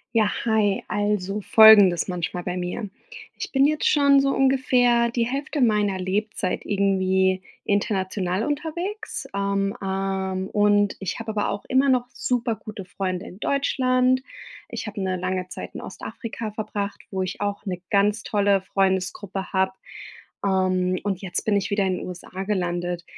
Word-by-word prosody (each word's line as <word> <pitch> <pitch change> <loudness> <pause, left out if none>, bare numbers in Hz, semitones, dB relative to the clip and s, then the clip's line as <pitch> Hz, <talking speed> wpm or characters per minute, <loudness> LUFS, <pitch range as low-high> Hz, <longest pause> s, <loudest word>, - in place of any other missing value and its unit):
Ja, 215 -2 +3
hi. 215 -3 +2
Also, 205 -1 -1
Folgendes 205 -6 +7
manchmal 180 0 -3
bei 180 0 -3
mir: 180 +4 -4 0.5
Ich - - -5
bin 270 0 +4
jetzt 305 +1 +1
schon 280 -2 +5
so 275 - +1
ungefähr 250 -3 +3
die 235 -1 0
Hälfte 280 +4 -3
meiner 210 -5 +2
Lebzeit 195 0 -2
irgendwie 190 -1 +2 0.2
international 195 -1 0
unterwegs. 345 +9 -4
Ähm, 200 +1 0
ähm, 190 -1 -2
und 205 -1 +3
ich 195 +2 -3
habe 225 -1 -4
aber 210 -1 -1
auch 200 - -4
immer 265 +2 +3
noch 250 -2 +2
super 240 -2 -1
gute 210 -3 -9
Freunde 185 0 -3
in 185 - -12
Deutschland. 255 -2 +2 0.5
Ich - - -5
habe 210 -1 -5
'ne 185 -1 -1
lange 185 0 -3
Zeit - - -8
in - - -5
Ostafrika 225 -2 -6
verbracht, 205 -1 -4
wo 190 -1 -2
ich 185 +1 -4
auch 205 +1 -2
'ne 180 -2 -4
ganz 205 +2 +2
tolle 200 -2 +2
Freundesgruppe 190 0 -1
habe. 190 -1 +1 0.7
Ähm, 185 -1 +1
und 195 -2 -2
jetzt 185 -3 -3
bin 215 - +2
ich 200 - -2
wieder 200 0 +2
in 185 -1 0
den - - -6
USA 180 +1 -7
gelandet. 175 -3 -2
200 Hz, 155 wpm, -24 LUFS, 190-225 Hz, 0.7 s, Folgendes